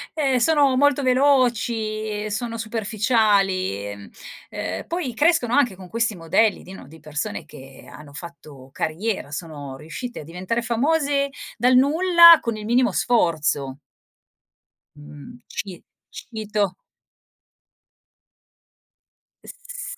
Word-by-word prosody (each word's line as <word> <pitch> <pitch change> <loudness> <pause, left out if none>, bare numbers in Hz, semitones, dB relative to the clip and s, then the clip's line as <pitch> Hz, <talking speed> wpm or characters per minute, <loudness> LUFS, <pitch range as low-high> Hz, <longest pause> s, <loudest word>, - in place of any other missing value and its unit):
eh 270 -5 +1
sono 280 0 +3
molto 285 0 +3
veloci 235 -5 +1
e - - -4
sono 230 +2 -3
superficiali, 210 - 0
ehm, 100 0 -11 0.4
ehm, - - -5
poi 330 -8 -3
crescono 295 -4 +2
anche 250 -8 +2
con 185 -1 -12
questi 230 0 0
modelli 185 +5 +1
di, 185 - -12
no, 190 -8 -11
di 160 +2 -15
persone 150 -1 -4
che 135 0 -14
hanno 150 -1 -13
fatto 150 -5 -11
carriera, 175 0 -3
sono 145 -4 -7
riuscite 170 - -7
a - - -10
diventare 185 +9 -3
famose 280 +4 +1 0.3
dal 250 +2 +3
nulla 335 +5 +7
con 230 -2 -3
il 215 - -8
minimo 240 -1 +2
sforzo. 155 - 0 1.2
Mhmm, 150 +12 -13
ci 190 -3 -7 0.3
cito. 210 -4 -3 2.7
S - - -7
220 Hz, 115 wpm, -22 LUFS, 170-255 Hz, 2.7 s, nulla